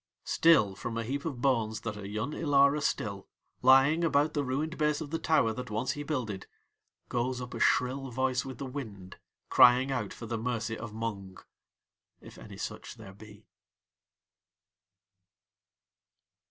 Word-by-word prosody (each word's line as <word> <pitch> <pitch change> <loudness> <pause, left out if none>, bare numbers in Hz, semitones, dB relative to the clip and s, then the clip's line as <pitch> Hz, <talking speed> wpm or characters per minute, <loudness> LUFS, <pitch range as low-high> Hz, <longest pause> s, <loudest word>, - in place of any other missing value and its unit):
Still 155 -12 +4
from 115 +4 -5
a 115 - -1
heap 140 +5 -4
of 135 -7 -4
bones 110 -5 +1
that 110 -2 -4
are 100 -1 -7
Yun 110 +7 -3
Ilara 145 -1 +3
still, 100 -7 -2 0.3
lying 135 +6 +5
about 150 -1 +2
the 145 - 0
ruined 145 +5 -2
base 150 -1 +1
of 155 -3 -7
the 165 - -1
tower 140 -9 +2
that 125 +1 -6
once 115 +5 -1
he 145 - -5
builded, 125 -10 -4 0.6
goes 125 +1 -1
up 125 -1 -7
a - - -5
shrill 130 +2 +1
voice 130 +1 0
with 130 -3 -8
the 140 - -5
wind 110 -9 -8 0.3
crying 125 +2 +6
out 130 - -2
for 115 - -8
the 115 0 -3
mercy 115 -1 -2
of 115 -1 -7
Mung, 105 -4 -5 0.8
if - - -14
any - - -11
such - - -6
there 95 - -12
be. 105 +1 -15
125 Hz, 155 wpm, -30 LUFS, 110-140 Hz, 0.8 s, crying